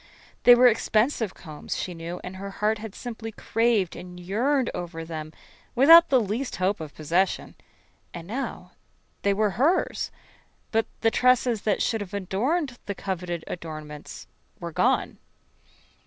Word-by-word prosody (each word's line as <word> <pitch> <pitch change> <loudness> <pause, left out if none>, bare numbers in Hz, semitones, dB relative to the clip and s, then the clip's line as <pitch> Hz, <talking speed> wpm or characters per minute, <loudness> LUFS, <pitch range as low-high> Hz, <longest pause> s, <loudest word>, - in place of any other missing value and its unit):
They 245 - +10
were 250 +1 +5
expensive 225 -1 +2
combs, 155 -4 -6
she 180 - -4
knew, 170 +1 -6
and 185 +1 -7
her 200 +1 -6
heart 210 +2 0
had 215 -2 -8
simply 225 -2 -6
craved 225 -4 +1
and 180 0 -9
yearned 240 +9 0
over 165 -2 -5
them 155 -1 -6 0.4
without 330 +7 +8
the 265 - +5
least 230 +5 -2
hope 190 +2 0
of 155 -2 -8
possession. 170 +5 0 0.6
And 170 -1 -8
now, 255 +7 -5 0.5
they 200 - +2
were 210 +1 +1
hers, 335 +7 +2 0.6
but 225 0 +1
the 225 - +3
tresses 250 -3 +3
that 205 - +2
should 225 -2 0
have 205 0 -6
adorned 245 - -1
the 200 - -3
coveted 180 -4 -4
adornments 155 -3 -8 0.3
were - - -5
gone. - - +1
205 Hz, 145 wpm, -26 LUFS, 180-240 Hz, 0.6 s, They